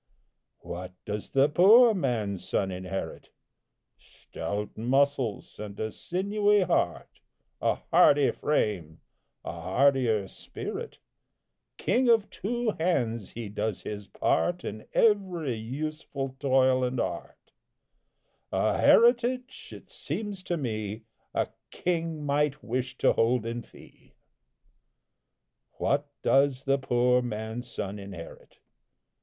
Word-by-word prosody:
What 90 Hz, +1 st, -7 dB
does 105 Hz, 0 st, -4 dB
the 135 Hz, +1 st, +4 dB
poor 220 Hz, +10 st, +7 dB
man's 115 Hz, -, -2 dB
son 95 Hz, -1 st, 0 dB
inherit? 95 Hz, +1 st, -5 dB, 0.7 s
Stout 105 Hz, +1 st, -6 dB
muscles 130 Hz, -1 st, 0 dB
and 105 Hz, -1 st, -7 dB
a 110 Hz, 0 st, -2 dB
sinewy 205 Hz, -, +1 dB
heart, 180 Hz, -2 st, -1 dB, 0.4 s
A -, -, +2 dB
hardy 145 Hz, -1 st, +4 dB
frame, 95 Hz, -, -1 dB, 0.5 s
a -, -, -3 dB
hardier 110 Hz, +4 st, +2 dB
spirit, -, -, -7 dB, 0.8 s
King 250 Hz, 0 st, +2 dB
of 225 Hz, -3 st, +3 dB
two 240 Hz, +2 st, -1 dB
hands 120 Hz, -, 0 dB
he 115 Hz, -2 st, -5 dB
does 105 Hz, 0 st, -3 dB
his 105 Hz, -1 st, -6 dB
part 175 Hz, 0 st, 0 dB
In 110 Hz, +1 st, -7 dB
every 185 Hz, -, +2 dB
useful 135 Hz, +3 st, -5 dB
toil 130 Hz, -2 st, +3 dB
and 125 Hz, 0 st, -1 dB
art; -, -, -5 dB, 1.0 s
A -, -, +1 dB
heritage, 245 Hz, +2 st, +3 dB
it -, -, -11 dB
seems 205 Hz, -3 st, -5 dB
to 175 Hz, -, -1 dB
me, 110 Hz, -5 st, -4 dB, 0.3 s
A -, -, +1 dB, 0.2 s
king 165 Hz, -3 st, -2 dB
might 145 Hz, 0 st, 0 dB
wish 130 Hz, +2 st, -3 dB
to -, -, +3 dB
hold 115 Hz, 0 st, +2 dB
in 115 Hz, +1 st, -3 dB
fee. -, -, -18 dB, 1.6 s
What 145 Hz, +1 st, 0 dB, 0.2 s
does 135 Hz, -1 st, +3 dB
the 135 Hz, 0 st, +2 dB
poor 125 Hz, -1 st, +2 dB
man's 115 Hz, +1 st, -5 dB
son 100 Hz, 0 st, -5 dB
inherit? 95 Hz, -4 st, -10 dB
130 Hz, 110 wpm, -28 LUFS, 110-165 Hz, 1.6 s, poor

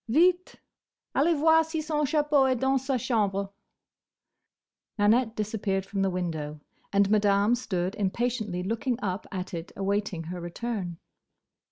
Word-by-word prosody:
"Vite! 355 Hz, +7 st, +3 dB, 0.6 s
Allez 315 Hz, +4 st, +3 dB
voir 320 Hz, +2 st, +5 dB
si 320 Hz, 0 st, -4 dB
son 305 Hz, -1 st, -1 dB
chapeau 295 Hz, -2 st, +3 dB
est 260 Hz, -, +2 dB
dans 265 Hz, +1 st, +2 dB
sa 265 Hz, -1 st, 0 dB
chambre!" 200 Hz, -4 st, 0 dB, 1.4 s
Nanette 225 Hz, +2 st, +3 dB
disappeared 205 Hz, -2 st, -1 dB
from 195 Hz, 0 st, -3 dB
the 195 Hz, -, +2 dB
window, 160 Hz, -5 st, -3 dB, 0.3 s
and 200 Hz, 0 st, +4 dB
Madame 205 Hz, +1 st, +4 dB
stood 190 Hz, -6 st, -1 dB
impatiently 210 Hz, -2 st, -1 dB
looking 230 Hz, +5 st, -1 dB
up 190 Hz, 0 st, -3 dB
at 185 Hz, -1 st, -5 dB
it 170 Hz, 0 st, -5 dB
awaiting 195 Hz, -3 st, -1 dB
her 175 Hz, +2 st, -6 dB
return. 180 Hz, -1 st, -4 dB
210 Hz, 135 wpm, -27 LUFS, 190-265 Hz, 1.4 s, voir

